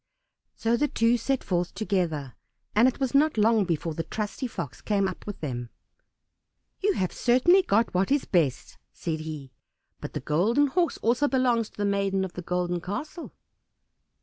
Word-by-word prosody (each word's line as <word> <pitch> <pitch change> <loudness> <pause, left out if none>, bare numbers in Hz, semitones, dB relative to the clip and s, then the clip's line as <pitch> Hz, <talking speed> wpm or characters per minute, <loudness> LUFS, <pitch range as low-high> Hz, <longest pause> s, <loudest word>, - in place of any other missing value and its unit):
So 230 +1 +1
the 295 - +2
two 230 -3 +2
set 260 +3 -1
forth 175 -1 -1
together, 175 - -1 0.4
and 225 +4 +5
it 260 - -1
was 265 -2 -1
not 295 -1 +3
long 215 -1 +4
before 165 -1 -2
the 165 - -3
trusty 215 - -4
Fox 145 - -6
came 200 -2 +1
up 185 - -7
with 205 - -6
them. 120 -5 -4 1.1
"You 405 +1 +2
have 185 - -1
certainly 260 +11 +4
got 230 - +1
what 185 +1 +1
is 285 0 +2
best," 155 -9 0
said 160 -2 -4
he, 155 -4 -7 0.5
"but - - -7
the - - -2
Golden 190 - +2
Horse 340 +5 0
also 245 +6 +3
belongs 245 -5 +1
to - - -26
the 205 - 0
maiden 195 -1 +1
of 180 - -8
the 180 - -6
Golden 175 0 -1
Castle." 295 - -6
205 Hz, 175 wpm, -26 LUFS, 175-250 Hz, 1.1 s, and